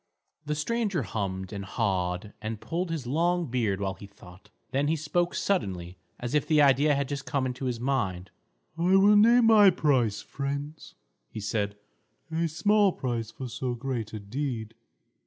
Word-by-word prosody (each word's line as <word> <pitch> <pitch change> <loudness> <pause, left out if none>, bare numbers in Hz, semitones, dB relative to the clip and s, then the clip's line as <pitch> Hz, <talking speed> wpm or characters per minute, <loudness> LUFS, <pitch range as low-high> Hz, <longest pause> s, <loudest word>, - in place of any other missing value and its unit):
The 150 - 0
stranger 200 - -1
hummed 95 -2 -4
and 100 -1 -5
hawed 95 -1 -2
and 110 0 -4
pulled 175 +7 -3
his 160 -6 -3
long 170 +6 +1
beard 110 -6 0
while 95 -1 -1
he 100 - -11
thought. 95 -2 -16 0.2
Then 140 +2 +1
he 160 - +2
spoke 175 +3 -1
suddenly, 90 - -2 0.2
as 120 +1 -4
if 150 - +1
the 155 -2 +4
idea 145 +1 +5
had 140 -1 -1
just 140 -1 -5
come 135 -2 0
into 130 +1 -4
his 125 -2 -2
mind. 95 -9 -1 0.5
"I 180 +3 +4
will 200 +2 +6
name 235 +3 +6
my 215 -3 +8
price, 130 - +1
friends," 140 +2 -5 0.3
he - - -7
said; 105 -1 -2 0.5
"a 165 +1 0
small 205 +5 +3
price 120 -3 -3
for 130 - -7
so 125 +1 -3
great 120 -3 -4
a 110 - -5
deed. 115 +1 -4
130 Hz, 170 wpm, -27 LUFS, 105-160 Hz, 0.5 s, my